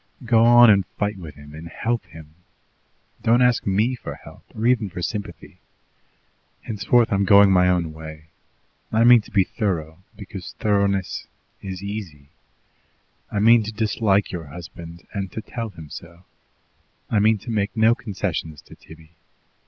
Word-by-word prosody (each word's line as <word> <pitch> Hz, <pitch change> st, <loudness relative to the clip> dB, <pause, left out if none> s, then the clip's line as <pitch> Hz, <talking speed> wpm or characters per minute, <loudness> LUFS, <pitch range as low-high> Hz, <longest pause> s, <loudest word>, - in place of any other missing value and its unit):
Go 115 Hz, -1 st, +4 dB
on 120 Hz, -1 st, +8 dB
and 100 Hz, -1 st, +3 dB
fight 105 Hz, -1 st, -1 dB
with 80 Hz, -4 st, -10 dB
him 75 Hz, 0 st, -14 dB
and 80 Hz, +2 st, -9 dB
help 115 Hz, +7 st, -3 dB
him. 80 Hz, -1 st, -14 dB, 0.9 s
Don't 120 Hz, +2 st, +3 dB
ask 125 Hz, -3 st, +2 dB
ME 105 Hz, +6 st, +1 dB
for 125 Hz, -, -7 dB
help, -, -, -15 dB
or 110 Hz, -, -3 dB
even 120 Hz, -4 st, +2 dB
for 90 Hz, 0 st, -7 dB
sympathy. 105 Hz, +1 st, -6 dB, 1.0 s
Henceforward 115 Hz, +2 st, +1 dB
I'm 100 Hz, 0 st, +2 dB
going 100 Hz, 0 st, +6 dB
my 90 Hz, -1 st, +4 dB
own 85 Hz, -3 st, 0 dB
way. 80 Hz, -1 st, -10 dB, 0.7 s
I 110 Hz, +1 st, +3 dB
mean 120 Hz, -1 st, +7 dB
to -, -, -16 dB
be 100 Hz, -4 st, +3 dB
thorough, 85 Hz, -5 st, -3 dB, 0.2 s
because 100 Hz, -3 st, -9 dB
thoroughness 100 Hz, -2 st, 0 dB, 0.3 s
is 95 Hz, -1 st, -7 dB
easy. 95 Hz, -9 st, -7 dB, 1.0 s
I -, -, -3 dB
mean 115 Hz, +3 st, +6 dB
to 110 Hz, +1 st, -5 dB
dislike 105 Hz, -2 st, 0 dB
your 85 Hz, -3 st, -6 dB
husband, 85 Hz, +2 st, -11 dB
and 100 Hz, -2 st, -4 dB
to -, -, -4 dB
tell 115 Hz, -2 st, -5 dB
him 80 Hz, -6 st, -12 dB
so. 85 Hz, +1 st, -11 dB, 0.9 s
I 110 Hz, -, +3 dB
mean 110 Hz, +1 st, +3 dB
to 115 Hz, +4 st, -8 dB
make 105 Hz, 0 st, -2 dB
no 110 Hz, +1 st, +5 dB
concessions 95 Hz, -9 st, -5 dB
to -, -, -15 dB
Tibby. 80 Hz, 0 st, -16 dB
100 Hz, 160 wpm, -22 LUFS, 85-110 Hz, 1.0 s, on